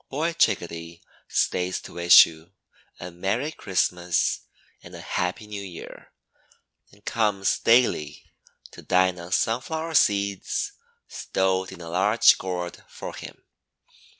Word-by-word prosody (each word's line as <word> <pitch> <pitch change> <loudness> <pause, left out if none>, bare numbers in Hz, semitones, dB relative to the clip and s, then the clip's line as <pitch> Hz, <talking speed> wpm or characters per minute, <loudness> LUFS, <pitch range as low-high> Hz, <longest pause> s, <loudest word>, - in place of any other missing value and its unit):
Boy 160 +5 -1
Chickadee 85 - -1 0.3
stays 90 0 0
to - - -12
wish 85 0 +8
you 80 +3 -14 0.5
"A 90 0 -7
Merry 100 - -2
Christmas" 90 - 0 0.4
and - - -12
"A - - -9
Happy 90 +4 -3
New 105 -1 -7
Year," 90 -4 -11 0.8
and 105 +1 -23
comes 105 -4 0
daily 115 -11 +2 0.5
to - - -12
dine 90 0 +2
on 85 +1 -10
sunflower 160 - -1
seeds 100 - +1 0.4
stowed 95 0 -1
in - - -11
a 85 - -8
large 100 +6 +4
gourd 90 -2 -5
for - - -8
him. - - -11
95 Hz, 125 wpm, -25 LUFS, 90-105 Hz, 0.8 s, wish